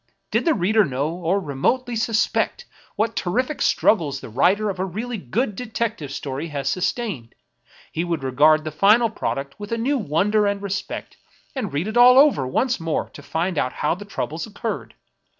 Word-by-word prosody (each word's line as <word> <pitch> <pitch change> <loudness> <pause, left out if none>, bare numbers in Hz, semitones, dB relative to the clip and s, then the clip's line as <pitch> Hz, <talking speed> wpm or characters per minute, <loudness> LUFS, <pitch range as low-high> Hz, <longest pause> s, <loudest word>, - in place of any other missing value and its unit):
Did - - +1
the 325 -3 +3
reader 210 +3 +3
know, 140 -1 -1
or 180 +3 0
remotely 215 - -1
suspect, 225 - 0 0.3
what 225 +1 0
terrific 255 +11 -1
struggles 155 -10 +2
the - - -9
writer 195 - +2
of 185 - -9
a - - +1
really 220 +5 -4
good 205 - -2
detective 220 - -3
story 140 +3 -4
had 145 -3 -4
sustained, 185 - -2 0.6
he 165 - -2
would 170 -5 -2
regard 150 +4 +4
the 155 - -4
final 215 +7 +4
product 140 -8 -4
with 205 +1 -7
a 230 - 0
new 265 +4 0
wonder 210 +4 +2
and 200 0 0
respect, 200 -1 -5 0.4
and 240 -9 -3
read 145 +7 -2
it 220 +2 -2
all 250 +1 +8
over 270 - +5
once 245 - 0
more 165 -1 -2
to - - -11
find 165 +2 -2
out 125 - -1
how 150 - 0
the 185 +4 -7
troubles 165 -4 -4
occurred. 220 +2 -5
195 Hz, 180 wpm, -22 LUFS, 155-225 Hz, 0.6 s, all